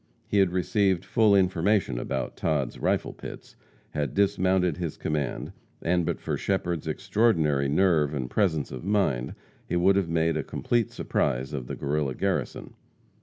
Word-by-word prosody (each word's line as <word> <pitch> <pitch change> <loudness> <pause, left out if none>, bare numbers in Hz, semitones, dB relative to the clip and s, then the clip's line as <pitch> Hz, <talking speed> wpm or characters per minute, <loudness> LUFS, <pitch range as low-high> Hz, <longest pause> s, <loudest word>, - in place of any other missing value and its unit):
He 100 - +1
had 95 -2 +4
received 95 +1 +1
full 110 -3 +4
information 95 - +2
about 65 +1 -3
Todd's 75 -6 -1
rifle - - 0
pits, - - -10 0.4
had 75 -2 -2
dismounted 95 -4 +2
his 85 -4 -4
command, 75 -4 -2 0.3
and 85 0 +1
but - - -1
for - - -2
Shepherd's 90 -4 -1
extraordinary 80 -11 +1
nerve 80 -2 +3
and 65 -3 -2
presence 80 - 0
of 65 - -7
mind, 95 -11 0 0.3
he - - -2
would 95 +3 +4
have 95 -4 0
made 80 0 +1
a - - -1
complete 120 -3 0
surprise 65 +4 -1
of 65 -4 -4
the - - -4
Guerrilla 70 -2 -1
garrison. - - -2
85 Hz, 155 wpm, -27 LUFS, 75-95 Hz, 0.4 s, had